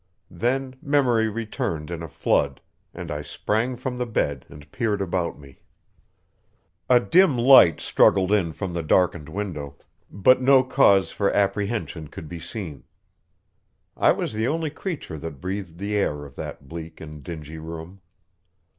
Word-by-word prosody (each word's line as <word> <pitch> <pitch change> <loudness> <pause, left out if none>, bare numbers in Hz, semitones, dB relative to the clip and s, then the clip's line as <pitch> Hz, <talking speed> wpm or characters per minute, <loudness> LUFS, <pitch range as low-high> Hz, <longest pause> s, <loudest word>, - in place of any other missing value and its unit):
Then 130 +2 -1
memory 130 -6 +2
returned 100 -8 -4
in 85 -1 -4
a 85 - -5
flood, - - 0 0.3
and 85 -2 -7
I 75 0 -3
sprang 110 - -2
from 125 0 -4
the 125 - -1
bed 70 - -1
and 75 0 -14
peered 110 -4 -1
about 90 -3 -2
me. 70 -3 -16 1.3
A 125 -1 +7
dim 165 +1 +4
light 120 - +7
struggled 95 0 +3
in 95 -6 +2
from 90 +2 -5
the 85 - -2
darkened 85 -1 +1
window, 80 -7 -5 0.3
but 130 +6 +4
no 130 0 +6
cause 100 -7 +4
for 100 - 0
apprehension 100 -4 -1
could 80 +1 -9
be 85 +2 -7
seen. 80 - -7 1.1
I - - +4
was - - -2
the 110 +2 0
only 160 0 -1
creature 150 - -5
that 80 -2 -7
breathed 95 -1 -5
the 100 +3 -3
air 75 -8 -1
of 70 - -13
that 70 - -8
bleak 80 +1 -8
and 75 -2 -9
dingy 80 0 -8
room. 80 +4 -9
95 Hz, 155 wpm, -24 LUFS, 80-120 Hz, 1.3 s, A